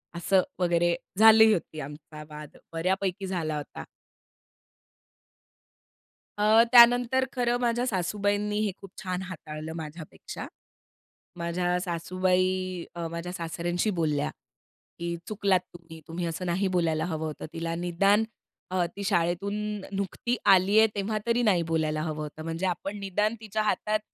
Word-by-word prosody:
असं 185 +2 +3 0.2
वगैरे, 175 -1 +2 0.2
झाली 220 0 +8
होती 160 -4 -4
आमचा 150 +2 -9
वाद 150 -1 -10 0.2
बऱ्यापैकी 190 +3 -1
झाला 160 -5 -2
होता. 145 - -7 2.5
अ, 215 +2 +6
त्यानंतर, 245 +2 +7
खरं 245 -1 +1
माझ्या 240 0 +1
सासूबाईंनी 205 +1 0
हे 205 - 0
खूप 195 - -11
छान 185 0 -2
हाताळलं, 160 -3 -7
माझ्यापेक्षा. 160 0 -8 0.9
माझ्या 175 +1 0
सासूबाई 185 +1 0
अ, 170 -1 -3
माझ्या 170 +1 -5
सासऱ्यांशी 175 +3 -2
बोलल्या, 150 -3 +1 0.7
की 170 0 -2
"चुकलात 200 -3 +2
तुम्ही, 165 -2 -12
तुम्ही 170 +2 -3
असं 170 +2 -4
नाही 185 +3 0
बोलायला 165 -4 +1
हवं 160 -2 -3
होतं 155 -1 -5
तिला, 165 0 -3
निदान 185 +5 +2 0.5
अ, 180 -2 +2
ती 200 - -5
शाळेतून 175 +2 0 0.4
नुकती 200 +5 -2
आली 195 +2 +6
आहे, 220 - +7
तेव्हा 210 +2 -1
तरी 235 +1 +2
नाही 185 -6 +3
बोलायला 155 -1 0
हवं 155 -1 -3
होतं, 155 +1 -8
म्हणजे 165 +3 -3
आपण 195 +3 -2
निदान 210 +3 0
तिच्या 215 -1 -2
हातात 215 0 0
180 Hz, 130 wpm, -27 LUFS, 165-205 Hz, 2.5 s, झाली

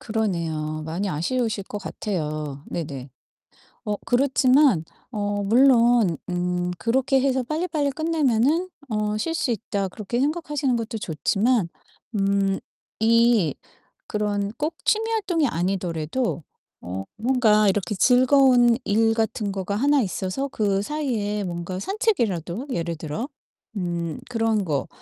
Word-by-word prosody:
그러네요. 165 -8 -2
많이 170 +6 -2
아쉬우실 205 +5 -1
것 205 - -6
같아요. 155 -8 -4
네네. 140 -5 -5 0.8
어 210 - 0
그렇지만 260 - +4 0.3
어 205 -2 -2
물론 235 - +4
음 180 0 -1
그렇게 260 +8 +1
해서 265 -1 +1
'빨리빨리 305 0 -1
끝내면은 315 +1 +1 0.2
어 210 -1 -1
쉴 325 +9 -2
수 265 -6 0
있다.' 205 -3 -2
그렇게 215 +5 -4
생각하시는 295 -3 0
것도 230 0 -3
좋지만 200 - +1 0.5
음 195 -1 +1 0.4
이 230 -5 +4 0.5
그런 205 -1 -1
꼭 310 +2 -2
취미 445 +1 +2
활동이 365 -9 +1
아니더라도 175 +1 -2 0.4
어 95 +2 -5
뭔가 220 -3 +3
이렇게 195 0 -1
즐거운 250 +1 +5
일 225 +1 +2
같은 220 -2 -1
거가 195 +1 -3
하나 285 +4 +3
있어서 195 +6 -2
그 200 -5 0
사이에 210 -6 -2
뭔가 175 +1 -4
산책이라도 235 - -1
예를 170 -6 -2
들어 160 - -4 0.5
음 170 -3 -3
그런 225 -3 +1
거 145 -5 -1
215 Hz, 260 characters per minute, -24 LUFS, 180-255 Hz, 0.8 s, 즐거운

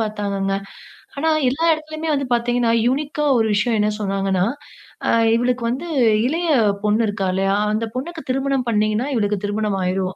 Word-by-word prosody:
பார்த்தாங்கங்க. 200 -2 -2 0.6
ஆனா 320 +3 +1 0.2
எல்லா 320 +6 -2
இடத்துலயுமே 310 0 -4
வந்து 275 -1 -1
பார்த்தீங்கன்னா, 240 0 +1 0.2
யூனிக்கா 295 +3 -1
ஒரு 225 - +2
விஷயம் 225 +3 +1
என்ன 210 - +2
சொன்னாங்கன்னா, 195 -2 0 0.6
அ - - +4 0.3
இவளுக்கு 245 +1 0
வந்து 265 +8 -3 0.4
இளைய 330 +5 -1 0.4
பொண்ணு 210 +2 +2
இருக்கால்லையா? 195 -1 0 0.2
அந்த 220 +2 -1
பொண்ணுக்கு 320 +6 -5
திருமணம் 270 -1 0
பண்ணீங்கன்னா 215 +4 +1
இவளுக்கு 210 -3 0
திருமணம் 205 -1 -1
ஆயிரும். 185 0 -1
230 Hz, 140 wpm, -20 LUFS, 205-275 Hz, 0.6 s, அ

